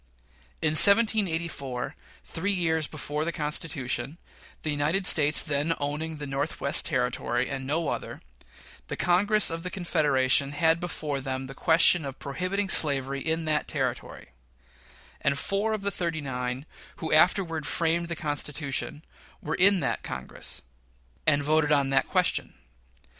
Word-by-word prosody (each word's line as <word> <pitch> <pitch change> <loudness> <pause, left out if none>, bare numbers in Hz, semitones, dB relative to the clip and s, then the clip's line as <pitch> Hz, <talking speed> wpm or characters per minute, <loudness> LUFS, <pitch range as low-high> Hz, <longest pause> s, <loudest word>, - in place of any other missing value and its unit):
In 160 - +3
1784, 170 - +3 0.3
three 185 +5 -2
years 160 -4 0
before 150 0 -4
the 170 - -1
Constitution 150 -1 -2 0.5
the 155 - -1
United 155 +7 0
States 150 -4 +5
then 150 +3 -1
owning 150 +2 -3
the 145 - -6
Northwestern 140 +1 -1
Territory, 125 0 -1
and 135 -1 -5
no 160 +2 -1
other - - -4 0.7
the - - -5
Congress 200 +3 +3
of 165 0 -4
the 180 - -4
Confederation 140 -6 +1
had 160 +1 +2
before 150 -5 -4
them 130 0 -4
the 135 - -8
question 165 +2 +4
of 135 -2 -6
prohibiting 185 +8 -2
slavery 140 -5 +2
in 160 +2 -1
that 155 -1 0
Territory; 130 - -4 0.9
and 140 0 +1
four 200 +7 -1
of 215 -2 -3
the 200 - -1
"thirty 170 -4 -2
nine" 125 -1 -4 0.3
who 160 - -3
afterward 165 -2 +2
framed 170 +1 0
the 170 - -4
Constitution 150 -1 -3 0.3
were 155 - -4
in 190 +1 +5
that - - -1
Congress 65 +1 -7 0.6
and 145 -1 +3
voted 155 +1 +2
on 140 -2 +2
that 135 - +2
question. - - 0
155 Hz, 140 wpm, -27 LUFS, 140-170 Hz, 0.9 s, States